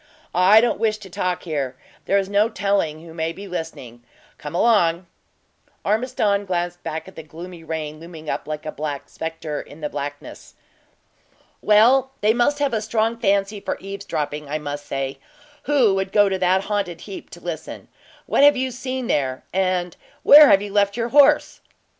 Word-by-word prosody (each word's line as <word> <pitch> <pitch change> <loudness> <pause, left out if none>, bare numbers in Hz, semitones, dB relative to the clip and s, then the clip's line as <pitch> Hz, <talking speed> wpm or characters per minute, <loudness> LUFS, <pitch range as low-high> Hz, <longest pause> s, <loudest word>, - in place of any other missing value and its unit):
"I 190 +5 +6
don't 240 - 0
wish 215 -1 +1
to 195 -4 -13
talk 180 0 -2
here; 140 -6 -3 0.3
there 200 - +2
is 195 -1 0
no 205 +3 +2
telling 180 -7 -1
who 165 - -11
may 160 0 -2
be 200 +4 -9
listening. 160 -9 -7 0.4
Come 150 +3 -7
along." 180 -5 +3 0.8
Ormiston 210 -2 +1
glanced 175 -1 -2
back 160 +2 -5
at 190 - -13
the - - -7
gloomy 165 +2 -10
rain 155 -1 -5
looming 165 -1 -11
up - - -3
like 155 -1 -5
a 155 - -3
black 145 -2 -5
spectre 160 -2 -5
in 150 +3 -14
the 150 - -2
blackness. 145 +1 -7 1.1
"Well, 250 +6 +4
they 215 +1 +4
must 245 +5 +2
have 285 -3 0
a 220 - 0
strong 220 +1 0
fancy 200 0 +1
for - - -4
eavesdropping, 155 -7 -5
I 150 - -1
must 145 -1 -6
say, 135 0 -3 0.5
who 265 -8 +3
world 190 0 -2
go 205 -1 +4
to 190 -1 -2
that 185 +1 +3
haunted 200 -5 -3
heap 195 -2 -9
to 175 - -11
listen. 170 -3 -7 0.4
What - - +1
have 290 -1 +7
you 260 0 -1
seen 255 0 -4
there, 130 - -1
and 185 -2 0 0.3
where 295 0 +9
have 195 +1 +5
you 205 -1 -7
left 200 +1 +2
your 235 0 -1
horse?" 290 +3 +4
190 Hz, 175 wpm, -22 LUFS, 160-215 Hz, 1.1 s, where